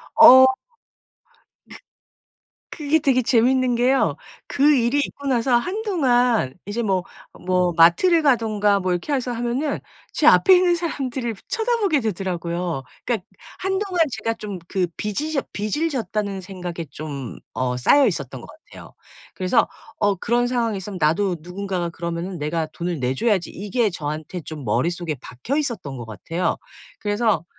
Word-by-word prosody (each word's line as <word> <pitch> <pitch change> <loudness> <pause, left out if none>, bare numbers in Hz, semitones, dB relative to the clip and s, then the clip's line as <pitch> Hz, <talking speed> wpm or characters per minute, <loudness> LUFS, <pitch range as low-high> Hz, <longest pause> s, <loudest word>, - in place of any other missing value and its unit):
어. 260 -4 +9 1.1
그 - - -10 1.0
그게 305 0 +2
되게 270 -4 +2
재밌는 250 +1 +3
게요. 255 +3 +2 0.3
그 295 +2 +4
일이 245 +2 +2
있고 280 0 -3
나서 245 -1 +2
한동안 250 - +1
이제 210 +4 -2
뭐 190 -4 0 0.4
뭐 180 -1 +2
마트를 315 - +5
가든가 215 -7 +2
뭐 185 -1 -1
이렇게 180 - -2
해서 260 -3 -1
하면은 240 +5 -2 0.3
제 - - +1
앞에 380 -1 +7
있는 360 -1 +3
사람들을 270 -7 -3
일부러 220 -4 -6
쳐다보게 445 - +1
되더라고요. 175 - -3 0.2
그러니까 220 -6 -2 0.3
한동안 380 -1 -1
제가 225 -2 -2
좀 205 -4 -6
그 185 -3 0
빚이 210 +10 -3
졌 275 - -1
빚을 215 +11 -1
졌다는 210 -8 -3
생각에 180 -3 -6
좀 140 -4 -7
어 125 -1 -1
싸여 270 - +4
있었던 140 - -4
것 - - -12
같아요. 315 +2 -14 0.4
그래서 185 -1 +2 0.3
어 205 -1 +2
'그런 240 +6 +1
상황이 235 -4 0
있으면 190 0 -7
나도 175 +5 +2
누군가가 180 0 -4
그러면은 170 +2 -5
내가 160 +2 -2
돈을 170 +1 -4
내줘야지.' 170 - 0
이게 210 +3 -1
저한테 155 +1 -5
좀 155 -3 -8
머릿속에 160 - -1
박혀 130 - -4
있었던 235 - -3
것 120 - -7
같아요. 140 - -2 0.4
그래서 205 -5 0
210 Hz, 320 characters per minute, -22 LUFS, 175-260 Hz, 1.1 s, 어